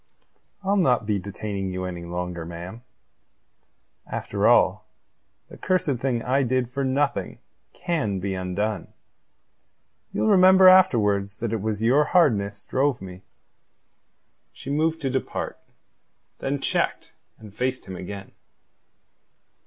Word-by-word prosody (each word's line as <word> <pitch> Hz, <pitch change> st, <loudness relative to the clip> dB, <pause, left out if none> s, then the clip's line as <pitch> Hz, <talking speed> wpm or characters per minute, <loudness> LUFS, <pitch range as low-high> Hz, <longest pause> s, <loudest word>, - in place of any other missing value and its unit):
"I'll 200 Hz, +1 st, +1 dB
not 125 Hz, -, +2 dB
be 105 Hz, -1 st, 0 dB
detaining 100 Hz, 0 st, -5 dB
you 95 Hz, 0 st, -4 dB
any 90 Hz, -2 st, -6 dB
longer, 90 Hz, 0 st, -4 dB
ma'am. 85 Hz, +7 st, -8 dB, 1.3 s
After -, -, -1 dB
all, -, -, +3 dB, 0.6 s
the -, -, -13 dB
cursed 180 Hz, -8 st, 0 dB
thing 120 Hz, -3 st, -1 dB
I 135 Hz, +2 st, +1 dB
did 130 Hz, -1 st, 0 dB
for 140 Hz, +2 st, -3 dB
nothing 140 Hz, +2 st, -1 dB, 0.3 s
can 130 Hz, -, -2 dB
be 95 Hz, +1 st, -3 dB
undone. 95 Hz, +2 st, -3 dB, 1.2 s
Ye'll -, -, -1 dB
remember 190 Hz, -2 st, +7 dB
afterwards 105 Hz, -, +4 dB
that 115 Hz, -1 st, -3 dB
it 110 Hz, -, -2 dB
was 110 Hz, 0 st, -2 dB
your 130 Hz, +6 st, +4 dB
hardness 105 Hz, -, +2 dB
drove 135 Hz, 0 st, 0 dB
me." 95 Hz, -1 st, -10 dB, 1.3 s
She -, -, -8 dB
moved 160 Hz, +2 st, 0 dB
to 135 Hz, -2 st, -1 dB
depart, 130 Hz, 0 st, -3 dB, 0.8 s
then 140 Hz, +1 st, -2 dB
checked, -, -, -1 dB, 0.2 s
and 105 Hz, -3 st, -13 dB
faced 125 Hz, +4 st, -2 dB
him 95 Hz, -, -7 dB
again. 95 Hz, +2 st, -8 dB
115 Hz, 120 wpm, -24 LUFS, 100-140 Hz, 1.3 s, remember